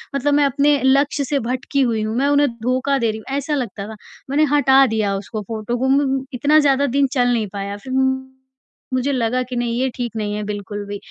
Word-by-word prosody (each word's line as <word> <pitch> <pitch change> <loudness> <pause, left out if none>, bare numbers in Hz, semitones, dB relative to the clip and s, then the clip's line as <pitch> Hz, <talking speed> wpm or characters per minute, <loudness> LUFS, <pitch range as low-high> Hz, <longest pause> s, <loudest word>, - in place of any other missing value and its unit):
मतलब 285 +2 +1
मैं 290 0 +4
अपने 285 +1 +2
लक्ष्य 280 +2 +2
से 280 +1 0
भटकी 260 +3 -2
हुई 230 -4 +1
हूँ, 215 +1 -3
मैं 275 +2 +2
उन्हें 290 0 +4 0.2
धोखा 255 +3 +1
दे 230 -2 +1
रही 215 - -6
हूँ, 220 - -15
ऐसा 290 +2 -1
लगता 205 -6 -4
था। 220 - -8 0.3
मैंने 290 +3 +2
हटा 270 -2 +5
दिया 215 -3 0
उसको 210 +2 -6
फ़ोटो 220 +3 -4
को 260 - 0
म 270 -1 +1
इतना 290 +5 +4
ज़्यादा 280 -1 +3
दिन 280 -1 +4
चल 245 -3 +2
नहीं 225 -3 0
पाया, 200 0 -4
फ़िर 260 +5 -8 1.0
मुझे 255 +2 0
लगा 255 -1 0
कि 250 0 -7
नहीं 240 0 -1
ये 265 - +1
ठीक 240 -2 -3
नहीं 210 -1 -2
है 210 - -3
बिल्कुल 205 0 -5
भी 205 - -5
255 Hz, 220 wpm, -20 LUFS, 220-280 Hz, 1.0 s, हटा